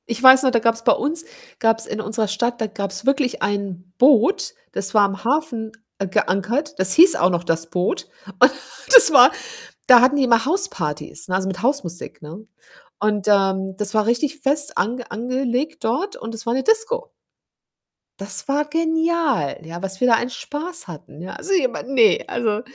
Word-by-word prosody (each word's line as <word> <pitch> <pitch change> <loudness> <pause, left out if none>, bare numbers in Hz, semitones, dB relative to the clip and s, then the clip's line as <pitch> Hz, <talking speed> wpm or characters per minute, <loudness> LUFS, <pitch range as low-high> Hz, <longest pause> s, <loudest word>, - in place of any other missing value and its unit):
Ich 235 0 -5
weiß 260 0 +8
noch, 260 - +2
da 235 - +2
gab's 230 0 0
bei - - +4
uns 320 +3 -2 0.3
gab's 225 -1 +1
in 215 - -5
unserer 220 0 -2
Stadt 235 +4 -2
da 220 - -2
gab's 200 -1 -6
wirklich 275 -2 0
ein 190 -3 -4
Boot, 285 - +3 0.2
das 195 0 -5
war 210 -2 +4
im 195 0 -8
Hafen 240 -4 -2 0.4
geankert. 230 +12 -1
Das 190 0 +4
hieß 345 +2 +6
auch 180 - +2
noch 175 -1 -2
„Das 165 -1 0
Boot.“ 180 - -2 0.3
Und - - +6 0.4
das - - +9
war 265 0 +8 0.6
da 245 -2 +8
hatten 260 +4 +3
die 280 - +1
immer 230 -2 +2
House-Partys, 165 - -3
ne, 185 - -2
also, 190 0 -1
mit 185 -2 -6
House-Musik, 200 - -3
ne? 170 +9 -11 0.5
Und, 210 -1 -1
ähm, 190 -2 +1
das 210 +1 -4
war 215 -1 +1
richtig 275 +6 -1
fest 290 +2 0
ange 240 +5 -3
angelegt 255 +5 -3
dort, 300 - -2
und 225 - -8
das 225 +1 -8
war 230 - 0
'ne 265 - -1
Disko. 480 - -1 1.1
Das 200 +1 -2
war 290 +2 0
genial, 320 - -1
ja, 170 +2 -8
was 195 0 -5
wir 250 - +2
da 235 - +5
einen 240 +2 -2
Spaß 320 - -5
hatten, 155 -2 -12
ja. 180 - -8
Also, 390 - -4
jemand 260 -7 -1
ne, 240 -5 +3
also. 220 -3 -2
235 Hz, 180 wpm, -20 LUFS, 195-285 Hz, 1.1 s, das